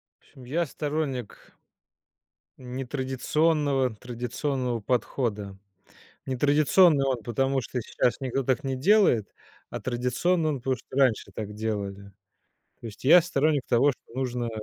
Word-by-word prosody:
В - - -77
общем 130 - -17
я 160 +8 -1
сторонник 145 -6 -4 1.0
нетрадиционного 135 +1 0
традиционного 125 +1 -3
подхода. 105 -4 -2 0.7
Нетрадиционный 145 +3 +4
он 130 -4 -1
потому, 135 +4 0
что 125 +1 -4
сейчас 120 +3 -1
никто 135 0 -1
так 130 +3 0
не 135 -1 -2
делает, 140 - +3 0.4
а - - -5
традиционный 130 +7 0
он 145 - -2
потому, 130 +1 -1
что 125 - -13
раньше 130 -5 +2
так 105 -1 -6
делали. 100 -2 -4 0.7
То - - -8
есть 105 0 -11
я 170 +6 +8
сторонник 150 -3 +1
того, 130 +4 +4
что - - -20
нужно 125 -2 -2
130 Hz, 125 wpm, -26 LUFS, 120-145 Hz, 1.0 s, я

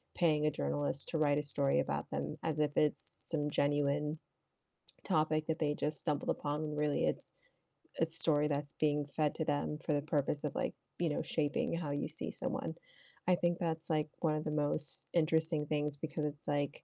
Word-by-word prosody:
paying 155 -3 +3
a 150 - +3
journalist 70 - -1
to 160 - -1
write 145 -2 +3
a 150 - 0
story 140 - +2
about 70 0 -2
them - - -3
as 160 -2 0
if 150 -1 +2
it's 150 -1 +3 0.3
some 150 -2 0
genuine 145 +1 +1 0.9
topic 155 0 +2
that 160 0 -1
they 150 -2 +2
just 150 +1 -1
stumbled 150 -3 -1
upon 145 +1 -1
when 150 -1 -3
really 150 -1 +1
it's - - -1 0.7
a 165 - +5
story 160 -2 +3
that's 145 0 -2
being 150 -1 +1
fed 150 -2 +2
to 160 - -1
them 145 0 0
for 155 - +2
the 145 - +2
purpose 145 -1 0
of, 150 - -1
like, - - 0 0.3
you 170 -2 +2
know, 150 - 0
shaping 145 0 0
how 155 -4 -3
you 145 0 -1
see - - -3
someone. - - -3 0.5
I 180 - +6
think 175 0 +1
that's, 165 -1 -2
like, 155 -1 +1
one 155 -3 +2
of 155 - -2
the 155 - -1
most 150 -1 +1
interesting 160 -2 +3
things 150 -1 0
because 155 +1 -3
it's, 145 - -11
like, 145 0 -1
150 Hz, 195 wpm, -35 LUFS, 145-155 Hz, 0.9 s, I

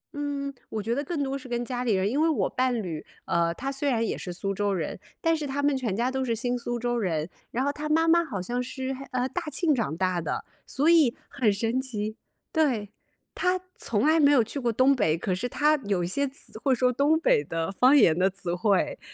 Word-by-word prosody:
嗯， 285 -1 -3 0.2
我 215 - -3
觉 230 +3 -1
得 285 +3 -1
更 295 -1 -2
多 270 0 -2
是 260 - -11
跟 240 0 -2
家 250 -1 -3
里 230 -4 +2
人。 190 +1 +1
因 285 +6 0
为 325 - +4
我 310 - +1
伴 250 -3 0
侣， 160 -4 -5 0.2
呃， 170 0 +1
他 270 +2 -3
虽 275 +1 -1
然 230 -2 +1
也 - - -1
是 180 - -6
苏 195 +3 -3
州 205 +1 0
人， 170 0 -3 0.2
但 330 0 +2
是 305 -2 -3
他 280 +1 -2
们 290 -1 +3
全 235 -7 -2
家 240 +3 +1
都 265 0 -1
是 230 -3 0
新 245 +2 -1
苏 240 0 -3
州 240 0 -1
人。 165 -7 -1 0.2
然 255 +3 -1
后 285 - +1
他 300 +1 -5
妈 325 +2 +3
妈 340 +1 +5
好 235 - -5
像 245 +6 -2
是， 260 +1 -4 0.2
嗯， 255 0 0
大 360 - -1
庆 315 0 +2
长 210 - -1
大 185 -1 0
的。 - - -3 0.2
所 285 +4 0
以， 315 -8 +5
很 230 -6 +1
神 225 +5 0
奇。 215 -4 -4 0.4
对， 245 - +1 0.4
他 365 0 +1 0.2
从 220 +3 -1
来 315 +1 +4
没 285 -1 +6
有 250 -5 +5
去 280 +6 -5
过 240 -2 0
东 260 +4 +4
北， 165 -9 +2
可 185 +2 -2
是 235 +7 -2
他 300 +4 +3
有 195 -3 0
一 170 - -1
些 280 +9 0
词 265 -4 -11
会 270 -2 +3
说 250 +1 +2
东 295 +5 +3
北 150 - +3
的 165 +4 -3
方 255 +8 +5
言 165 - +5
的 185 +2 +3
词 185 -2 -5
汇。 195 - +1
245 Hz, 260 characters per minute, -27 LUFS, 205-280 Hz, 0.4 s, 没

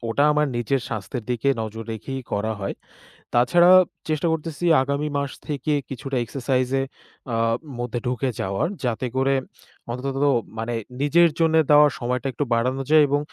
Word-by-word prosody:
ওটা 140 +5 +2
আমার 150 0 +2
নিজের 120 +3 0
স্বাস্থ্যের 110 +2 -5
দিকে 120 +3 0
নজর 110 +1 -6
রেখেই 135 +4 -5
করা 110 +2 0
হয়। 100 - -3 0.6
তাছাড়া 175 +10 +5 0.4
চেষ্টা 155 +2 0
করতেছি 160 +1 -3 0.2
আগামী 140 +3 -1
মাস 140 -1 -2 0.2
থেকে 150 0 -1 0.2
কিছুটা 135 0 -4
exercise-এ, 130 +1 0 0.5
আ - - +1 0.4
মধ্যে 120 0 -2
ঢুকে 125 +1 -1
যাওয়ার 95 - -1 0.2
যাতে 120 +1 -1
করে 135 +1 +2 0.6
অন্তত 135 +2 -4 0.4
মানে 115 +2 -3 0.3
নিজের 170 +4 +5
জন্যে 160 -1 +4
দেওয়া 150 0 +8
সময়টা 125 +3 -2
একটু 135 - -1
বাড়ানো 125 +3 0
যায়, 155 -1 +7
এবং 145 +1 +2
135 Hz, 150 wpm, -23 LUFS, 120-145 Hz, 0.6 s, দেওয়া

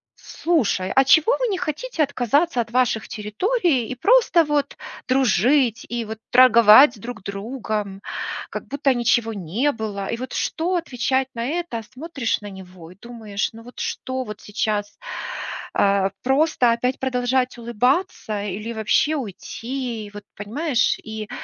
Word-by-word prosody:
"Слушай, 220 - -1
а 270 - +6
чего 315 - +5
вы - - +1
не 400 -4 -1
хотите 355 - -2
отказаться 280 +1 +1
от 230 - -6
ваших 245 -3 +1
территорий 265 - 0
и 255 - -4
просто 405 - +4
вот 290 -1 -1 0.3
дружить 250 -1 +2
и 235 -1 -3
вот 220 0 -7
торговать 240 0 +7
друг 235 -1 -7
с - - -30
другом, 205 -1 -4 0.5
как - - -7
будто 280 -1 +1
ничего 235 -1 +1
не 205 - -1
было?" 210 -5 -5
И 230 - -2
вот 255 +1 -6
что 350 +3 -1
отвечать 265 -5 0
на 230 - -3
это? 325 -7 -3
Смотришь 275 -4 -2
на 205 - -7
него 180 -3 -12
и - - -15
думаешь: 220 -4 -4
"Ну 225 +1 -12
вот 245 +1 -13
что 260 0 -3
вот 210 -2 -9
сейчас 210 -1 -2 0.8
а, 195 -1 +2
просто 265 -2 +3
опять 250 +2 -1
продолжать 255 -1 0
улыбаться 235 - -1
или 210 +4 -4
вообще 220 +8 +2
уйти?" 240 0 -5
И 205 - -14
вот 205 0 -10
понимаешь? 245 +5 0
И 220 -1 -6
240 Hz, 150 wpm, -22 LUFS, 215-275 Hz, 0.8 s, торговать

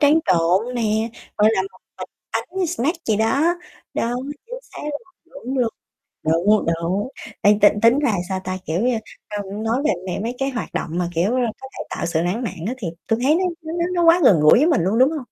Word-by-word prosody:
tráng 295 +1 +5
trộn 185 +8 +2
nè, 220 -1 0 0.3
gọi 210 +1 +5
là, 190 - +1
một 195 - -10 0.2
bịch - - -6 0.2
bánh 370 +1 -2
snack 325 0 -1
gì 220 - +2
đó. 275 +11 +2 0.4
Đúng, 245 +4 -2 0.2
chính - - -7
xác - - -11
luôn. 295 -1 -3 0.4
Đúng 260 +2 -2
luôn. 240 -3 +2 0.5
Đúng, 175 +7 +3 0.2
đúng. 190 +6 -1 0.3
Ê, 205 0 +5
t - - +7 0.2
tính 235 +4 +5
ra, 290 -5 +2 0.2
sao 190 -1 -1
ta, 185 0 -3
kiểu 160 +2 -1
như, 245 -1 +2 0.5
ưm, 200 +2 -6
nói 230 +5 0
về - - +4 0.3
m - - -4
mấy 235 +2 -3
cái 270 0 0
hoạt 250 -4 -5
động - - -2
mà, 175 -1 0
kiểu, 180 +7 +2
ơ, 255 - +2 0.2
có 265 - -7
thể - - -4
tạo - - -3
sự 165 -1 0
lãng 185 +8 -1
mạn 205 -6 -3
á 240 - -1
thì 210 -9 -4 0.2
tui 225 0 +1
thấy 295 +4 +4
nó 365 - +1 0.2
nó 320 0 -6
nó 340 0 0
nó 350 -1 +2
quá 345 - +6
gần 195 - +6
gũi 150 +6 +7
với 300 - +4
mình 305 - +3
luôn, 195 +6 +1
đúng 260 +3 +6
hông? 320 - -3
230 Hz, 235 wpm, -21 LUFS, 195-280 Hz, 0.5 s, t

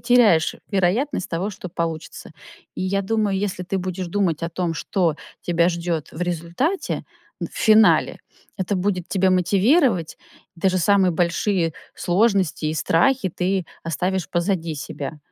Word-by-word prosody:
теряешь 235 -10 +4
вероятность 200 +4 0
того, 180 +4 -2
что 185 -2 -8
получится. 165 -2 -5 0.4
И - - -4
я 195 +1 0
думаю, 210 -1 0
если 190 -2 -2
ты 190 +2 -3
будешь 185 0 -4
думать 170 -3 0
о 165 - -1
том, 170 0 -2
что 165 -1 0 0.3
тебя 170 0 +2
ждет 170 -3 -2
в 160 - -9
результате 175 - -2 0.4
в - - -3
финале, 220 0 +4 0.4
это 195 +1 -1
будет 185 -2 -1
тебя 190 -1 +2
мотивировать. 190 - +2 0.4
И - - -16
даже 185 0 +2
самые 190 +1 +4
большие 170 0 0 0.2
сложности 190 -4 +1
и 155 - -1
страхи 190 - +2
ты 185 +1 -1 0.2
оставишь 180 +3 -2
позади 170 -2 -1
себя. 145 +1 -6
185 Hz, 140 wpm, -22 LUFS, 170-200 Hz, 0.4 s, теряешь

